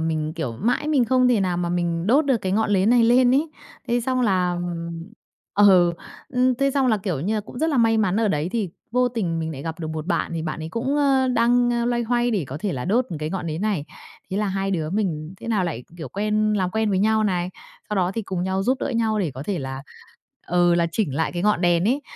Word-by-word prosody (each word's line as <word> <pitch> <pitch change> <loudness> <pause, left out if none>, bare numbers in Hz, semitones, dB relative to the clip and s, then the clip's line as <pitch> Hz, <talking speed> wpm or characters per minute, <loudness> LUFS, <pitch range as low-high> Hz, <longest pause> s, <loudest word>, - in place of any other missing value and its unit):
mình, 155 -1 -1
kiểu, 160 -8 -4
mãi 235 - -1
mình 275 -6 +3
không 255 +1 +3
thể 230 -5 +3
nào 180 -2 0
mà 175 -1 -1
mình 175 0 -1
đốt 280 +7 +4
được 265 -4 +3
cái 190 -3 -3
ngọn 215 +1 +1
nến 200 +2 +3
này 240 -2 +5
lên 250 +2 +5
ấy, 300 +3 +1 0.4
thế 240 +1 +1
xong 255 +2 -1
là, 185 -6 +2
ừm 175 -1 -4 0.6
ờ, 185 -4 +5 0.4
ưm, 255 0 +2
thế 275 +2 +1
xong 275 -1 +1
là, 220 -3 +3
kiểu 185 -8 -3
như 205 +8 -1
là, 210 - 0
cũng 220 +3 -10
rất 320 +3 +1
là 290 - 0
may 225 -1 +3
mắn 195 -2 +1
ở 225 -2 +2
đấy 155 0 0
thì 215 -7 -1 0.2
vô 250 +1 +2
tình 195 -9 -2
mình 160 0 -3
lại 140 -2 -7
gặp 165 +1 -5
được 160 - -4
một 155 +1 -5
bạn, 200 - -1
thì 160 - -3
bạn 155 0 -4
ấy 160 - -5
cũng, 260 - -2
ơ, 270 -2 +3
đang 240 0 +2
loay 240 -1 0
hoay 240 +1 +1
để 200 -8 0
có 135 - -5
thể 200 -4 -1
là 125 -1 -4
đốt 235 +6 +2
một 165 - -4
cái 155 +1 -3
ngọn 180 -3 -4
nến 160 +2 -3
này. 200 -9 -1 0.5
Thế 190 - -2
là 210 0 0
hai 195 0 -2
đứa 160 -4 -2
mình 180 -5 -2
thế - - -7
nào 210 -5 +1
lại, 140 -8 -4
kiểu, 160 - -7
quen 215 +1 0
làm 185 -3 0
quen 220 +1 0
với 190 - +1
nhau 220 +1 +2
này, 180 -2 -1 0.4
sau 210 - -2
đó 180 -1 +1
thì 225 - -2
cùng 185 -2 -3
nhau 190 +1 -1
giúp 255 +5 +1
đỡ - - -1
nhau 225 -2 0
để 175 -7 0
có 130 - -6
thể 195 +1 -2
là 135 0 -5 0.6
ờ, 175 0 +3
là 170 -1 +2
chỉnh 165 -11 -1
lại 160 +3 -1
cái 175 0 -3
ngọn 210 -4 +2
đèn 175 0 +2
ấy, 275 +4 0
200 Hz, 265 wpm, -23 LUFS, 170-235 Hz, 0.6 s, này